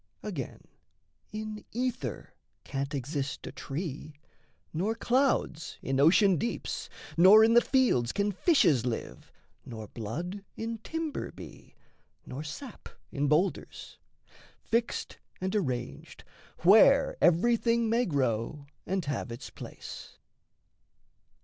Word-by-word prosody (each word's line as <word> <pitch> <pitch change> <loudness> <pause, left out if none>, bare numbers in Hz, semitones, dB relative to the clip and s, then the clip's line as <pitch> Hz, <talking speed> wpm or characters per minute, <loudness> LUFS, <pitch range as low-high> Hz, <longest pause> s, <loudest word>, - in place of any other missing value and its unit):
Again, - - -5 0.7
in 215 0 -6
ether 250 +1 -3 0.3
can't 140 +1 -3
exist 140 +1 -3
a - - -6
tree, 150 0 -6 0.6
Nor 195 +8 0
clouds 240 - 0
in 135 0 0
ocean 180 +5 +5
deeps, 235 - -3 0.3
nor 195 +6 +9
in 225 +1 +5
the 240 - +7
fields 240 - +2
Can 205 0 0
fishes 180 - +3
live, 120 -2 -5 0.3
nor 110 -4 -8
blood 170 - -5
in 225 0 -4
timber 320 +4 -4
be, - - -13 0.5
Nor 140 +4 -6
sap 215 - -8 0.2
in 145 +1 0
boulders: 160 +7 -1 0.6
fixed 230 +1 -1 0.2
and 190 +2 -2
arranged 130 - -3 0.4
Where 225 +9 +6
everything 230 +6 +3
may 235 +3 +2
grow 135 -1 -1 0.2
and 190 -2 -1
have 140 -3 -3
its 115 - -8
place. - - -10
180 Hz, 110 wpm, -29 LUFS, 140-230 Hz, 0.7 s, nor